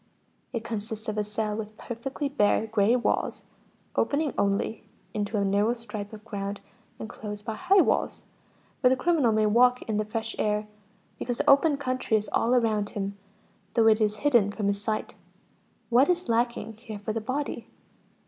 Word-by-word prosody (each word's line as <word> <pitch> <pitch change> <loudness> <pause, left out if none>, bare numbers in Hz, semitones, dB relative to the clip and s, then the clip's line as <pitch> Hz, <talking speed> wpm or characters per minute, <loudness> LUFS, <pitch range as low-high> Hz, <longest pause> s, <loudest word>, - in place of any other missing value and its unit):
It 235 -3 -3
consists 220 -1 -5
of 215 - -3
a - - +1
cell 210 0 -2
with 215 0 -6
perfectly 265 +5 -4
bare 220 -5 +2
gray 220 +1 +3
walls, 245 - -1 0.5
opening 290 -1 +1
only 200 +2 0 0.3
into 210 +1 -2
a 200 - +1
narrow 205 +4 +2
strip 210 -3 -7
of 215 -1 -11
ground 200 -2 -4 0.4
enclosed 210 -2 -7
by 220 - -2
high 385 - +4
walls, - - 0 0.6
where 250 - +5
the 260 - +4
criminal 295 -4 +2
may 215 0 +3
walk 245 +4 +4
in 215 -2 -2
the 215 - +1
fresh 225 +1 -4
air, 210 0 0 0.5
because 245 -1 -2
the - - -2
open 280 +1 +5
country 255 -5 0
is 210 -1 -4
all 240 +2 +3
around 215 -4 +1
him, 200 -1 -4 0.6
though 230 -2 +4
it 220 0 +5
is 210 0 +1
hidden 240 -8 +5
from 205 0 -3
his 200 0 -1
sight. 215 +1 -2 0.8
What 255 +6 +5
is 360 0 +1
lacking 235 -1 0
here 220 -2 -8
for 205 +1 -4
the 225 - -2
body? 265 +6 -3
220 Hz, 175 wpm, -27 LUFS, 210-245 Hz, 0.8 s, where